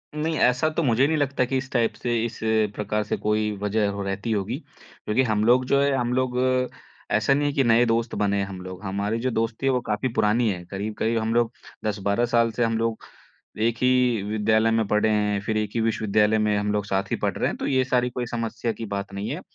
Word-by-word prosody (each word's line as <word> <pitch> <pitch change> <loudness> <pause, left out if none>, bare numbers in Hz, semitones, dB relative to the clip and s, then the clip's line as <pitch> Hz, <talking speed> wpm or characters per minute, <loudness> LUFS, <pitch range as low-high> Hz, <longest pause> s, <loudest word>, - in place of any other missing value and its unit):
नहीं 155 +1 -1
ऐसा 125 +5 +3
तो 155 +1 -1
मुझे 125 -1 +3
नहीं 160 +1 +1
लगता 140 -3 +1
कि 130 +2 -1
इस 130 0 -5
टाइप 120 -3 +1
से 120 -1 0
इस 115 -1 -6 0.4
प्रकार 105 0 -1
से 105 - -2
कोई 105 0 0
वज़ह 105 +1 +1
हो 100 0 -5
रहती 100 +3 -3
होगी। 100 -3 -1 0.5
क्योंकि 110 +5 +2
हम 110 -3 +1
लोग 125 +2 +4
जो 140 +2 +3
हैं, 140 0 +2
हम 125 -2 0
लोग 130 -1 0 0.7
ऐसा 110 +5 +3
नहीं 145 +1 +1
हैं 145 - -1
कि 140 - +3
नए 120 0 +4
दोस्त 115 0 0
बने 100 -1 +1
हैं 100 - 0
हम 95 -1 -8
लोग। 95 +1 -9
हमारी 100 +3 -2
जो 130 +2 -1
दोस्ती 115 +3 -2
है 135 - +4
वो 125 -1 +1
काफ़ी 105 +4 0
पुरानी 110 0 +2
है। 90 -3 -3
करीब-करीब 110 +3 -2
हम 110 +1 -1
लोग 120 -1 +2 0.3
10-12 100 +2 0
साल 115 -1 +3
से 120 +2 -1
हम 115 -1 +1
लोग 115 0 -2 0.6
1 115 -1 -1
ही 125 -3 +3
विद्यालय 110 +2 +2
में 115 0 +2
पढ़े 105 +1 +2
हैं। 105 -1 +1
फ़िर 110 +1 -2
1 105 -1 -1
ही 115 - +1
विश्वविद्यालय 110 -1 +2
में 105 -1 +1
हम 105 0 0
लोग 105 -1 -1
साथ 95 -1 -2
ही - - +2
पढ़ - - -1
रहे - - +1
हैं। - - -5
तो - - -4
ये 130 -1 +2
सारी 125 -1 +1
कोई 125 0 -4
समस्या 115 0 -2
की 115 - -6
बात 100 0 -5
नहीं 100 +1 -4
है। - - -4
115 Hz, 240 wpm, -24 LUFS, 105-125 Hz, 0.7 s, लोग